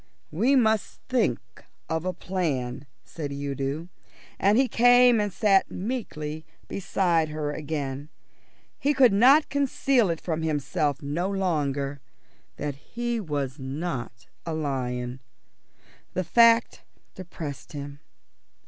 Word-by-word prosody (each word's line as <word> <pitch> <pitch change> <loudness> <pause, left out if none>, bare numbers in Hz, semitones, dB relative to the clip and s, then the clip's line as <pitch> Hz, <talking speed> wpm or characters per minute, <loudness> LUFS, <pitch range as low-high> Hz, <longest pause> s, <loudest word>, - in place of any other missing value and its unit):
"We 230 - +3
must 220 -4 +1
think 225 - +2 0.5
of 160 +1 -2
a 185 - 0
plan," 145 -8 -3 0.2
said 145 +4 -6
Udo, 140 +3 -3 0.5
and 200 +3 +4
he 265 0 +4
came 245 -1 +5
and 205 -1 -1
sat 195 -1 +3
meekly 165 -9 -4 0.2
beside 175 -4 0
her 150 -1 -3
again. 145 -2 -4 0.7
He 290 +1 +1
could 255 -6 +6 0.4
conceal 270 -5 +2
it 165 -1 -1
from 160 -2 -3
himself 150 -1 -1
no 165 +7 -1
longer 145 -8 -1 0.5
that 145 -1 -3
he 235 +10 -3
was 145 -7 -3
not 130 -4 -5 0.2
a 165 -2 -3
lion. 125 -4 -3 1.0
The 185 - 0
fact 230 +4 +4 0.3
depressed 160 -7 -8
him. 145 0 -7
160 Hz, 110 wpm, -26 LUFS, 140-205 Hz, 1.0 s, could